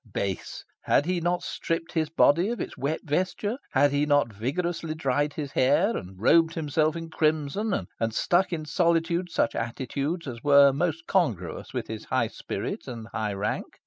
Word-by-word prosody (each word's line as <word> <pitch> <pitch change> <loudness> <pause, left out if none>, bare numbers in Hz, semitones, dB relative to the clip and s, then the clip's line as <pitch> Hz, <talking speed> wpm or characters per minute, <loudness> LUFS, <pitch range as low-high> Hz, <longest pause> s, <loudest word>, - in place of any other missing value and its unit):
Base! 95 -1 -4 0.2
Had 145 - +3
he 180 0 0
not 175 +1 0
stripped 165 0 -3
his 155 -2 0
body 170 +4 +4
of 240 - -3
its - - -5
wet 140 +4 -2
vesture? 185 - -1
Had 145 0 +4
he 145 +1 +1
not 145 -6 +2
vigorously 160 - -2
dried 145 0 0
his 145 -3 -5
hair, 145 - +3
and 95 +1 -7
robed 165 +9 +4
himself 155 0 +1
in 165 -1 -6
crimson, 155 - 0
and 115 0 0
struck 180 +2 +2
in 160 -3 -3
solitude 170 +1 +1
such 145 - +1
attitudes 140 +8 -3
as 120 -4 -7
were 140 -1 +7
most 165 +2 -1
congruous 115 - -1
with - - -3
his - - -7
high - - 0
spirit - - -5
and 115 -3 -7
high 105 -2 -2
rank? 100 +2 -3
155 Hz, 175 wpm, -26 LUFS, 135-170 Hz, 0.2 s, were